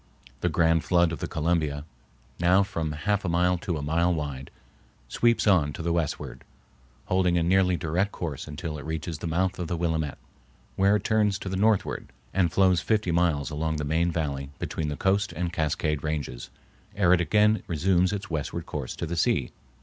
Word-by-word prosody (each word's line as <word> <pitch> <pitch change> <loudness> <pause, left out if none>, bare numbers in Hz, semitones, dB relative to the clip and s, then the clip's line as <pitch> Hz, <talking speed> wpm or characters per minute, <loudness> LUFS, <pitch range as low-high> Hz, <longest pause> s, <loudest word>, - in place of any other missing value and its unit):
The 90 - 0
grand 80 0 +2
flood 85 -2 +3
of 85 - -5
the - - -3
Columbia, 75 -3 -1 0.5
now 90 +3 +4
from 85 -6 -3
half 100 +7 -1
a 95 - -1
mile 90 +1 +2
to 85 -2 -3
a 70 - -5
mile 85 +4 +2
wide, 70 -5 -4 0.6
sweeps 120 -1 +2
on 85 -9 +3
to 80 - -6
the 85 0 0
westward, 85 -3 -3 0.6
holding 90 -1 +2
a 85 - +2
nearly 90 +1 +3
direct 90 +5 0
course 75 -6 -5
until 75 0 -5
it - - -8
reaches 80 +1 -4
the 85 - -4
mouth 90 +3 0
of 90 - -3
the 85 - -2
Willamette, 80 -4 -1 0.6
where 100 +2 +4
it 105 - -1
turns 105 -2 +2
to 100 - -6
the 95 - -2
northward 105 +1 +1 0.2
and 90 -4 +2
flows 95 -1 +3
fifty 105 -4 +1
miles 85 -4 +1
along 80 +1 -1
the 75 - -3
main 80 +4 +1
valley 70 -4 -3
between 80 - -3
the 75 - -3
Coast 100 0 +1
and 85 +1 -3
Cascade 75 -2 -1
Ranges 75 -6 -4 0.5
ere 90 -3 +4
it 90 - +3
again 105 +4 +3
resumes 90 +3 +2
its 105 +1 -4
westward 80 -6 -3
course - - -5
to - - -4
the 85 +2 -3
sea. 85 - +1
85 Hz, 190 wpm, -26 LUFS, 80-95 Hz, 0.6 s, now